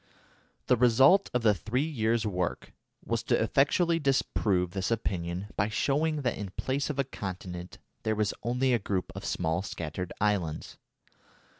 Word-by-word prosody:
The 125 - +4
result 130 - +5
of 125 -1 0
the 105 -2 +5
three 120 - -1
years' 115 -6 0
work 90 -4 -2 0.3
was - - -1
to - - +2
effectually 165 +4 +2
disprove 105 - +1
this 95 0 -2
opinion 95 -4 -2
by 100 +3 +1
showing 145 +7 0
that 120 -4 -1
in 100 -2 -4
place 135 +2 -1
of 150 - -3
a 140 - +2
continent 90 -7 -7 0.2
there 110 0 0
was 105 -1 0
only 125 +2 +1
a 120 - +3
group 95 -2 -2
of 95 - -6
small 85 0 0
scattered 90 -1 -5
islands. 95 -7 -1
110 Hz, 155 wpm, -29 LUFS, 95-130 Hz, 0.3 s, result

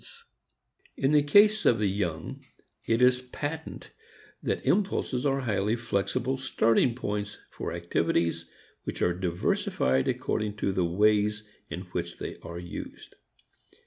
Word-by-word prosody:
II - - -16 1.0
In 135 - +4
the 150 -1 +6
case 205 +8 +5
of 115 - +4
the 105 - 0
young 90 -5 -2 0.4
it 115 +2 +3
is 125 0 +5
patent 145 +5 -6 0.5
that - - -2
impulses 165 -9 +1
are 135 0 +1
highly 110 -2 0
flexible 120 +3 -1
starting 115 -2 +2
points 105 -4 -3
for - - -5
activities 85 -1 0 0.3
which - - -3
are 90 - +3
diversified 85 -7 0
according 105 -1 -1
to 100 -2 -1
the 95 -2 +1
ways 105 +4 +2 0.3
in 90 - -5
which - - -3
they - - -6
are 85 0 -8
used. 85 0 -8
105 Hz, 135 wpm, -28 LUFS, 90-130 Hz, 1.0 s, the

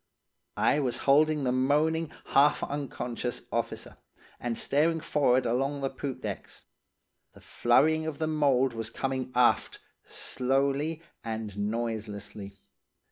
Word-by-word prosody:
"I 150 - +3
was 125 -4 0
holding 150 +1 +4
the 125 - +1
moaning, 150 +5 +1 0.2
half 145 +2 +4
unconscious 125 -4 -4
officer, - - -3 0.4
and 120 -2 -3
staring 160 +4 +2
forrard 130 -5 +2
along 135 +4 0
the 135 - -1
poop 135 0 -5
decks. - - -6 0.7
The - - -16
flurrying 155 +6 +2
of 155 -2 -4
the 160 - -1
mould 140 -5 +2
was 115 -1 -4
coming 130 -1 -3
aft, 125 -1 +3 0.2
slowly 140 +5 -1 0.2
and 110 -3 -4
noiselessly. 105 -2 -4
135 Hz, 120 wpm, -28 LUFS, 120-150 Hz, 0.7 s, holding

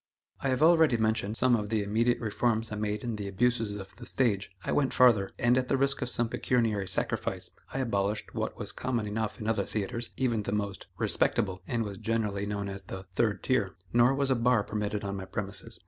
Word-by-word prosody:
I - - -2
have 130 +3 +2
already 160 -6 +6
mentioned 110 -1 0
some 130 -1 +4
of 105 -2 -2
the 110 -2 +1
immediate 115 +4 +2
reforms 115 0 0
I - - -2
made 105 0 -2
in 115 -3 -3
the 100 -1 -4
abuses 110 +1 +1
of 95 -1 -8
the 120 - -9
stage. 105 -7 +1 0.2
I - - -1
went 140 -2 +2
farther, 115 -6 +5
and, 120 +2 +3
at 125 - -2
the - - +2
risk 135 +1 +1
of 125 - -1
some 120 -1 0
pecuniary 115 -5 0
sacrifice, 95 - -2 0.2
I - - -4
abolished 105 -5 -1
what - - -3
was - - -4
common 120 -4 -2
enough 105 +1 -3
in 105 - -4
other 110 -2 +2
theatres, 115 +4 -3
even 120 -4 +1
the 105 - -3
most 100 -2 -3
"respectable," 95 -3 +1
and 115 -2 0
was 100 -3 -6
generally 105 -3 -1
known 100 -1 -2
as 100 -1 -7
the 95 0 -7
"third 105 -1 +1
tier." 110 -8 +1 0.2
Nor 120 +3 +5
was 140 -1 +1
a - - +4
bar 120 -2 +3
permitted 105 0 -3
on 100 0 -3
my 95 - -5
premises. 95 +1 -4
110 Hz, 215 wpm, -29 LUFS, 100-120 Hz, 0.2 s, already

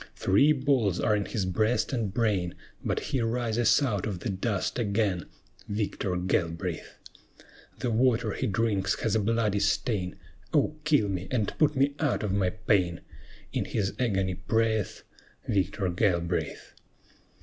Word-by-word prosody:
Three 105 +11 +4
balls 130 - +2
are 105 - +2
in 100 -1 -1
his 100 -5 -2
breast 110 +9 +1
and 115 -6 -1
brain, 100 -6 0 0.3
But - - 0
he 130 - -1
rises 120 +2 +2
out 105 -7 -1
of 95 -5 -4
the - - -3
dust 100 +3 -1
again, 100 -6 0 0.4
Victor 100 -2 -2
Galbraith! 90 -1 -2 0.8
The 120 - -2
water 115 -1 +2
he 130 - -2
drinks 105 -2 0
has 110 - 0
a 110 - +3
bloody 105 -1 +1
stain; 100 -2 0 0.4
"Oh, 155 - +2
kill 145 -9 +3
me, 95 -2 -3
and 110 -5 -1
put 150 -1 +4
me 140 +1 +2
out 145 -7 0
of 100 -3 -1
my 95 -2 +2
pain!" 90 -2 +1 0.5
In - - 0
his 100 -3 -1
agony 95 -6 +1
prayeth 110 +2 0 0.4
Victor 100 0 0
Galbraith. 85 -2 -1
105 Hz, 145 wpm, -28 LUFS, 95-115 Hz, 0.8 s, Three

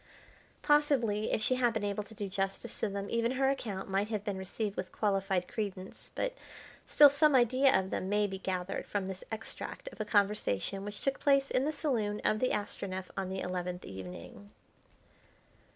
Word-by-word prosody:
Possibly 265 -8 +3
if 215 - +1
she 255 - +3
had 245 -2 +2
been 220 - -1
able 205 0 -1
to 220 - -11
do 205 -1 -3
justice 195 +4 -3
to 220 - 0
them, 200 0 -4
even 230 +1 +1
her 270 +1 +3
account 210 -8 -4
might 195 +2 0
have 215 -2 -3
been 200 -3 -3
received 200 +2 -3
with - - -4
qualified 195 -3 0
credence; 195 -3 -5
but - - -1 0.5
still 295 - +8
some 285 +1 +4
idea 255 0 +5
of 190 0 -4
them 185 - -2
may 210 +1 +3
be 190 -1 -4
gathered 190 0 -3
from 200 -2 -1
this 190 -1 -6
extract 220 - -5
of 230 - -8
a - - -1
conversation 200 - +1
which 205 0 -6
took 275 0 0
place 275 -1 +3
in 255 - +2
the 305 - +1
saloon 225 -10 -1
of 215 - +2
the 255 - +2
Astronef 190 -2 -3
on 190 -1 -2
the 190 0 -3
eleventh 180 0 -3
evening. 95 +1 -9
205 Hz, 185 wpm, -32 LUFS, 190-240 Hz, 0.5 s, still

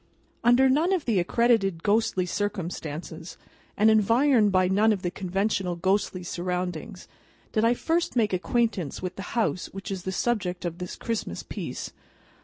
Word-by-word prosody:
UNDER 245 +3 +5
none 305 +8 +3
of 360 -5 -1
the 220 -6 +2
accredited 195 -3 +2
ghostly 205 -3 +2
circumstances, 170 -4 -4 0.4
and 215 +1 +5
environed 225 +1 +4
by 185 -1 +3
none 205 +4 +3
of 200 -3 -1
the 175 - -1
conventional 195 -1 -1
ghostly 185 +1 0
surroundings, 180 +2 -4 0.4
did 215 - +1
I 235 +1 +4
first 335 +4 0
make 215 -5 +2
acquaintance 195 -3 -1
with 185 - -4
the - - -6 0.2
house 215 -5 0
which 195 +1 -8
is 190 -2 -3
the 190 - -4
subject 190 -4 -1
of 170 +1 -4
this 180 -1 -5
Christmas 215 - -4
piece. - - -6
195 Hz, 155 wpm, -26 LUFS, 180-230 Hz, 0.4 s, UNDER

